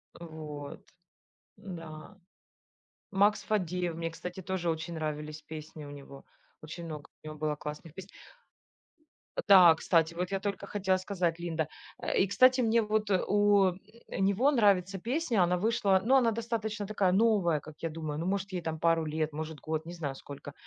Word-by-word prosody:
А, 170 - -9
вот. 150 -3 -8 0.8
Н-да. 170 -2 -9 0.9
Макс 205 +2 +3
Фадеев, 180 -4 -1
мне, 165 0 -3
кстати, 180 +3 -7
тоже 185 -2 -1
очень 160 +1 -4
нравились 155 -1 -4
песни 155 -1 -9
у 145 - -9
него, 140 -1 -11 0.4
очень 160 +2 -8
много 155 -2 -8
у - - -13
него 155 0 -7
было 150 -1 -1
классных 150 +2 -8
песен. 190 +1 -10 1.4
Да, 180 -5 +9
кстати, 165 0 +2
вот 180 +2 -3
я 195 - 0
только 200 0 -3
хотела 190 -2 +1
сказать, 185 -3 -1
Линда. 165 -3 -2 0.3
Э, - - -1
и, 195 - +4
кстати, 255 +6 +5
мне 230 0 +3
вот 215 -1 0
у 200 -1 +3 0.3
него 200 +9 +2
нравится 195 -6 +3
песня, 240 - +1
она 180 +1 +2
вышла, 205 -2 +2
ну, 260 +3 +5
она 245 -4 +4
достаточно 220 -2 -3
такая 200 -3 +1
новая, 195 -6 +3
как 155 +1 -12
я 165 - -1
думаю, 155 -2 -5
ну, 165 - -3
может, 195 +1 -1
ей 180 - -2
там 160 -1 -4
пару 165 0 +2
лет, 155 0 -2
может 155 0 -5
год, 155 +1 -3
не 170 - -7
знаю, 150 -6 -4
сколько. 140 +1 -10
175 Hz, 170 wpm, -30 LUFS, 160-200 Hz, 1.4 s, Да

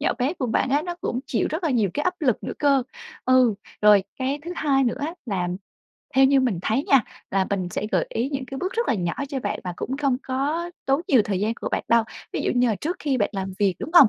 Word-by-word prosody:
nhỏ 295 - +2
bé 265 +4 +1
của 270 -7 -2
bạn 245 +3 +1
á 290 +2 +3
nó 350 +1 -4
cũng 245 - -2
chịu - - 0
rất 320 +4 -3
là 320 - +2
nhiều 220 -7 +2
cái 295 - -1
áp 360 +3 +1
lực 255 -8 +1
nữa - - -3
cơ. 280 -2 +4 0.4
Ừ, 255 -3 +5 0.3
rồi 210 -2 +7 0.2
cái 270 +2 -1
thứ 345 - -4
hai 270 -2 +2
nữa 240 - 0
á 310 +4 -3
là 185 -5 -1 0.7
theo 270 +1 +6
như 270 0 +5
mình 240 -9 +1
thấy 225 +7 +1
nha 275 -4 +5 0.3
là 190 -1 +1
mình 190 -3 -1
sẽ 210 - -2
gợi - - +2
ý 235 +4 -1
những 270 -1 -2
cái 270 +1 -6
bước 370 +5 -2
rất 470 0 -1
là - - +3
nhỏ 175 -4 -1 0.2
cho 275 -2 -3
bạn - - -2
và 180 - -3
cũng 265 - -3
không 275 -3 +1
có 290 +6 -1 0.2
tốn 275 +2 +3
nhiều 255 -6 +6
thời 195 -3 -1
gian 220 +3 0
của - - -4
bạn - - -2
đâu. 230 -1 +4 0.3
Ví - - -2
dụ - - +1
như 245 0 +4
là 220 - +2
trước 345 +4 -2
khi 280 -3 0
bạn 205 - +1
làm 195 -1 -3
việc, 200 -3 +2
đúng - - -5
hông? 290 -9 +10
260 Hz, 275 wpm, -24 LUFS, 215-285 Hz, 0.7 s, hông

